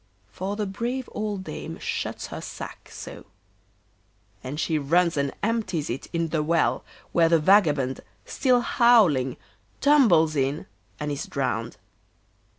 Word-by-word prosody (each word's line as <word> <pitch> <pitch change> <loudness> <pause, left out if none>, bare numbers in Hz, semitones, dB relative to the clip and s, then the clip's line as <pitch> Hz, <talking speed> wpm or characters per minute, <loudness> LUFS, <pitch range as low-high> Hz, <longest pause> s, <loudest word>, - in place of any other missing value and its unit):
For 190 - -4
the 210 0 -2
brave 240 +6 -3
old 210 -3 -3
dame 160 0 -7
shuts - - -4
her - - -5
sack, - - -8
so; - - -9 1.2
and 140 +4 -5
she 160 -2 0
runs 170 +4 +2
and 140 -1 0
empties 200 - -1
it 125 - -5
in 165 -1 -1
the 155 -1 0
well, 165 +2 +1 0.3
where 165 -1 +4
the 165 - +5
vagabond, 150 -7 +3 0.2
still 250 -2 +2
howling, 195 - +4 0.4
tumbles 205 - +4
in 140 +2 -1 0.3
and 150 -1 -3
is 140 - -4
drowned. - - -2
165 Hz, 135 wpm, -25 LUFS, 150-210 Hz, 1.2 s, the